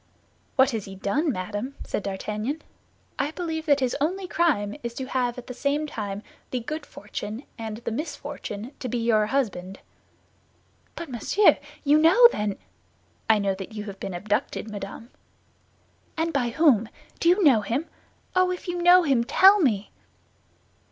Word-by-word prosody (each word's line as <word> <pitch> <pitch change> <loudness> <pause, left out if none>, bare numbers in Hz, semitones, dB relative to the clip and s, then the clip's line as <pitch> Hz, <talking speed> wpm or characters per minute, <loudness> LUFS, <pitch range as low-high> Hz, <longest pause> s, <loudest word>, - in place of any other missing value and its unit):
"What 265 +1 +5
has 220 -4 -3
he 195 - -9
done, 280 - 0
madame?" 210 +6 -4
said - - -3
D'Artagnan. 215 +9 -4 0.6
"I 285 - +1
believe 320 -1 -4
that 285 -2 +4
his 255 -1 0
only 365 +5 -1
crime 270 -14 +1
is 235 -1 -5
to 260 - -4
have 250 -2 -1
at 250 - -8
the 250 - -7
same 285 +4 0
time 205 -7 -5 0.3
the 255 - -2
good 295 +6 -5
fortune 210 +3 -7
and 220 -2 -5
the 230 0 -5
misfortune 280 -4 -5
to 255 - -4
be 245 - -1
your 225 -2 +2
husband." 195 -7 -2 1.2
"But, 335 -3 -6
monsieur, 390 - +3 0.2
you 295 +1 +5
know 370 +10 +8
then—" 210 -1 -2 0.7
"I 220 - +6
know 200 -1 +1
that 190 +2 -8
you 210 -1 -5
have 200 -2 -8
been 190 - -5
abducted, 210 +3 -2
madame." 205 +3 -7 1.1
"And 330 +1 0
by 250 -4 +1
whom? 235 -5 +3 0.3
Do 335 - +3
you 370 +3 +4
know 260 -9 +6
him? 245 +9 -2 0.5
Oh, 370 0 +4
if 365 +1 -5
you 350 0 -2
know 355 +1 +7
him, 270 -6 +2
tell 385 - +6
me!" 220 - +1
250 Hz, 165 wpm, -25 LUFS, 210-310 Hz, 1.2 s, know